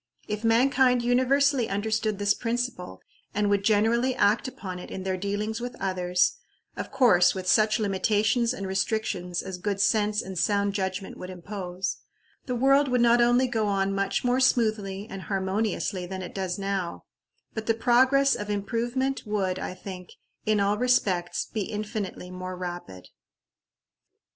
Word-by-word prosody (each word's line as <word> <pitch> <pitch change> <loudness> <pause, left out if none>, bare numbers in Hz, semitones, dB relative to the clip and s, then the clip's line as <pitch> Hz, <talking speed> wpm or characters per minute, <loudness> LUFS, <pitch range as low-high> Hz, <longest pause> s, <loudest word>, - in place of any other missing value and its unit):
If 210 +1 -4
mankind 250 +2 +3
universally 260 +1 +2
understood 215 +1 -1
this 205 0 +2
principle, 230 - -3 0.3
and 205 0 +1
would 200 -1 +2
generally 225 +5 +2
act 210 +1 +2
upon 185 -8 -7
it - - -9
in 190 - -6
their 190 0 -1
dealings 205 +4 -3
with 245 0 -5
others 180 -2 +1 0.4
of - - -5
course, 180 -10 +4
with 185 -1 -5
such 215 +2 +4
limitations 215 +3 +1
and 200 -6 -5
restrictions 190 -2 -2
as 190 -1 -6
good 200 +1 -2
sense 210 +1 +2
and 190 -2 -5
sound 200 0 +1
judgment 190 -1 -3
would 180 - -8
impose 185 0 -5 0.5
the 250 - -1
world 275 +3 +4
would 250 -1 +1
not 240 0 +5
only 245 +2 +4
go 225 -3 0
on 195 -1 0
much 195 0 -1
more 250 +1 +2
smoothly 215 -6 +1
and 195 -4 -7
harmoniously 195 -1 -1
than 190 0 -5
it 180 - -8
does 185 -2 -3
now, 195 -3 -3 0.5
but 220 -1 -5
the 225 - +3
progress 260 +4 +4
of 210 0 -4
improvement 235 +6 -2
would, 190 -3 -1
I 185 - -5
think, 185 -1 -9 0.3
in 215 -1 +3
all 200 +1 +1
respects 195 -8 +1
be 215 - -4
infinitely 210 -3 -5
more 185 0 -6
rapid. 175 - -7
205 Hz, 155 wpm, -26 LUFS, 190-235 Hz, 0.5 s, not